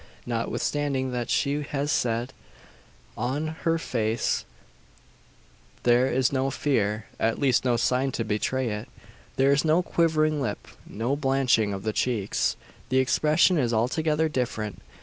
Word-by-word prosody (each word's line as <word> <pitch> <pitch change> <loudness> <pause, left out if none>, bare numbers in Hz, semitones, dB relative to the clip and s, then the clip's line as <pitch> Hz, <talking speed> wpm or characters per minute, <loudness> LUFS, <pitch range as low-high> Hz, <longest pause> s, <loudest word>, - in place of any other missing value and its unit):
Notwithstanding 130 +3 -1
what 125 0 -3
she 145 +1 +1
has 145 0 -2
said, 120 +1 0 0.8
on 135 +7 -2 0.2
her 165 0 +3
face 115 -7 -1 1.4
there 120 +1 +4
is 130 0 +1
no 135 0 +1
fear 110 -6 0
at 115 0 +1
least 130 -4 +2
no 125 -2 +2
sign 130 +3 +1
to 115 - -1
betray 115 +4 -1
it. 105 0 -5 0.5
There 135 +1 +3
is 140 +1 +3
no 160 +3 +3
quivering 155 -3 +1
lip 135 - -4 0.2
no 120 +6 -2
blanching 135 -6 +2
of 95 -1 -5
the 110 0 -1
cheeks. 110 -6 0 0.3
The 130 - +1
expression 155 +6 +3
is 120 -4 +1
altogether 155 +7 +1
different. 115 -7 -3
130 Hz, 135 wpm, -26 LUFS, 115-145 Hz, 1.4 s, there